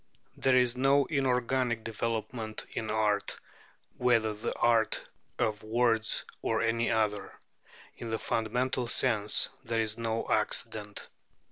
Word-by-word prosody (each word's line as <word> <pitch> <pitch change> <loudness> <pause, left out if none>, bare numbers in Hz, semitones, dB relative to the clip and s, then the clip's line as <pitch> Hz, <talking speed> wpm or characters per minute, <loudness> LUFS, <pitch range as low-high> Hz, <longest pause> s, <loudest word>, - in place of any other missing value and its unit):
There 130 -1 +3
is 125 -1 +3
no 135 +2 +4
inorganic 125 -3 0
development 110 0 -3
in 110 - -3
art, 105 -1 +1 0.6
whether 115 -3 +2
the 105 - -3
art 115 -2 +2 0.3
of 110 -3 0
words 115 0 +1 0.2
or 110 - 0
any 115 +1 +1
other: 105 -2 0 0.6
in 115 - -7
the 110 - 0
fundamental 125 +3 -1
sense, 105 -2 +2
there 115 -2 -1
is 110 0 -1
no 115 0 -1
accident. - - -1
115 Hz, 120 wpm, -30 LUFS, 110-125 Hz, 0.6 s, no